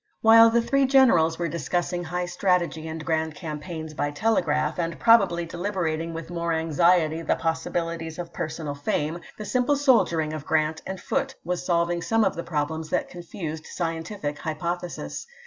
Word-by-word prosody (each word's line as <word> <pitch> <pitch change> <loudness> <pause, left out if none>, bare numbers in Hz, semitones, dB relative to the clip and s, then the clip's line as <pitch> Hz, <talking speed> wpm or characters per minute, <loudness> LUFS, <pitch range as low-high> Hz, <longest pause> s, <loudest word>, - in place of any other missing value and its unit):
While 225 +1 +8
the 235 +1 +2
three 275 +2 +2
generals 230 -13 +5
were 170 - -1
discussing 175 +2 -2
high 180 +2 -2
strategy 175 -3 0
and 160 -1 -6
grand 160 -1 -1
campaigns 160 0 -6
by 145 -1 -1
telegraph, 155 -3 0
and 170 -1 -2
probably 195 -7 +4
deliberating 170 -2 -2
with 165 +1 -7
more 170 -1 -1
anxiety 165 0 +2
the - - +1
pos 160 0 -1
sibilities 165 -1 -3
of 170 -1 -6
personal 155 -2 -4
fame, 150 +3 -2 0.2
the 215 - -6
simple 255 +5 +2
soldiering 200 - +2
of 155 -2 -5
Grant 155 +1 0
and 190 -1 -5
Foote 270 0 -2
was 180 +1 -2
solving 170 0 +1
some 225 +5 +2
of - - +2
the 170 - -3
problems 160 0 -3
that - - -1
confused 165 -3 -7
scientific 165 -2 -4
hypothesis. 170 - -4
170 Hz, 165 wpm, -25 LUFS, 160-180 Hz, 0.2 s, While